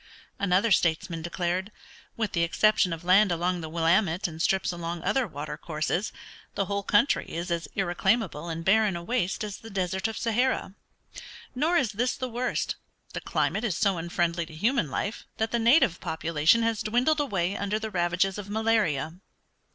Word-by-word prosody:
Another 200 +3 +2
statesman 165 -1 +1
declared, 175 +4 -2 0.5
"With 220 -2 -1
the 170 - 0
exception 185 +2 +3
of 165 0 -5
land 190 +2 +5
along 175 +1 0
the 160 - -6
Willamette 170 +4 +2
and 160 -1 -7
strips 190 +1 +1
along 170 -1 -5
other 265 -3 +1
water 150 -3 -6
courses, 165 +5 -2 0.4
the 195 - 0
whole 200 +1 -2
country 205 +7 +2
is 170 +2 -4
as 170 -1 -1
irreclaimable 175 -2 0
and 165 0 -5
barren 210 -1 +3
a 170 - -5
waste 215 -2 -1
as 210 -2 -5
the 225 - -11
Desert 190 0 -1
of 225 - -5
Sahara. 235 -3 0 0.8
Nor 315 +7 +2
is 255 -8 +1
this 245 +5 0
the 255 - -3
worst; 245 +2 -2 0.4
the - - -4
climate 215 - -1
is 200 -9 -1
so 195 -1 +1
unfriendly 170 0 -1
to 155 - -12
human 215 - +1
life 200 +10 -4
that 220 0 -1
the 235 - +1
native 235 - +4
population 160 +6 +2
has 225 -2 0
dwindled 250 +8 +2
away 195 -9 0
under 200 +1 -1
the 220 0 -5
ravages 180 +2 0
of 200 -1 -8
malaria." 210 -9 +1
190 Hz, 175 wpm, -27 LUFS, 170-220 Hz, 0.8 s, land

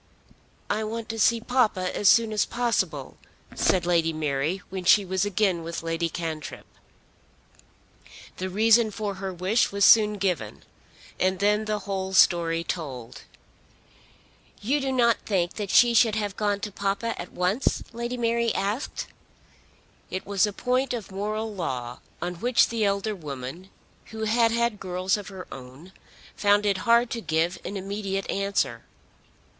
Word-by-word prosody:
"I 215 +1 -1
want 225 +1 -5
to 225 0 -4
see 230 +2 +4
papa 220 -7 0
as 200 - +4
soon 230 -2 +4
as 210 - +2
possible," 190 - -2 0.4
said 180 -2 +1
Lady 170 -2 +2
Mary 155 +3 -2
when 190 -1 -4
she 195 +3 +5
was 190 +1 0
again 200 -3 +1
with 165 0 -5
Lady 165 0 -1
Cantrip. 160 -2 -5 1.7
The 185 +1 -3
reason 220 +3 +4
for 210 -1 -4
her 195 -1 -3
wish 185 +6 +1
was 200 0 +3
soon 210 -2 +6
given, 180 - -2 0.6
and 185 0 +1
then 210 +3 +2
the 215 0 -1
whole 190 -1 -4
story 170 -3 +4
told. 130 -9 -6 1.4
"You 275 +8 0
do 270 0 -1
not 235 -3 +3
think 180 -4 0
that 205 -3 -3
she 240 +3 +6
should 225 -1 +4
have 205 -2 -2
gone 205 -1 -1
to 210 - -4
papa 200 +4 -2
at 175 - -9
once?" 185 +9 0
Lady 235 +2 -4
Mary 235 -1 +1
asked. 210 +8 -2 1.0
It 185 - -4
was 200 +1 +2
a - - -3
point 250 +4 0
of 220 -4 -7
moral 215 +3 -3
law 125 -9 -4 0.2
on 175 -1 -4
which 245 +1 +3
the 230 -2 -1
elder 200 +1 0
woman, 150 +1 -7 0.4
who 220 0 -7
had 230 +1 +3
had 235 -2 0
girls 185 0 -1
of 205 -3 -6
her 190 -2 -8
own, 135 +8 -11 0.4
found 205 0 +3
it 200 -2 +1
hard 235 0 +5
to 230 - -3
give 170 0 0
an 200 - -5
immediate 195 0 -3
answer. 200 0 -1
200 Hz, 155 wpm, -26 LUFS, 180-220 Hz, 1.7 s, soon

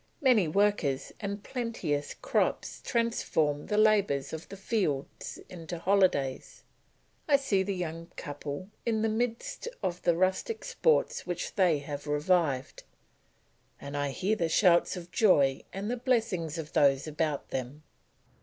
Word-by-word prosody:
Many 245 - +4
workers 185 -6 +1
and 200 0 -4
plenteous 225 - -3
crops - - -1
transform 160 - 0
the 210 - 0
labours 205 -11 +3
of 160 +1 -7
the 195 - -8
fields 190 - -2
into 170 -1 -7
holidays; 180 -8 +1 0.6
I 290 - +5
see 270 -9 +2
the 195 0 -2
young 165 -2 -4
couple 145 +4 -6
in 220 -2 0
the 225 - +2
midst 230 - -2 0.2
of 175 -1 -2
the 170 - +3
rustic 190 - 0
sports 485 - +1
which 175 -1 -3
they 180 -6 +3
have 145 0 -6
revived, 150 -3 +1 1.0
and 140 0 -7
I 145 0 0
hear 190 +10 0
the 170 -6 0
shouts 175 +1 +4
of 175 0 -9
joy 145 -9 +4
and 200 +4 -4
the 245 - -1
blessings 220 - 0
of 155 -2 -6
those 135 -1 +4
about 155 -2 -2
them. 135 +4 -5
180 Hz, 140 wpm, -29 LUFS, 145-215 Hz, 1.0 s, I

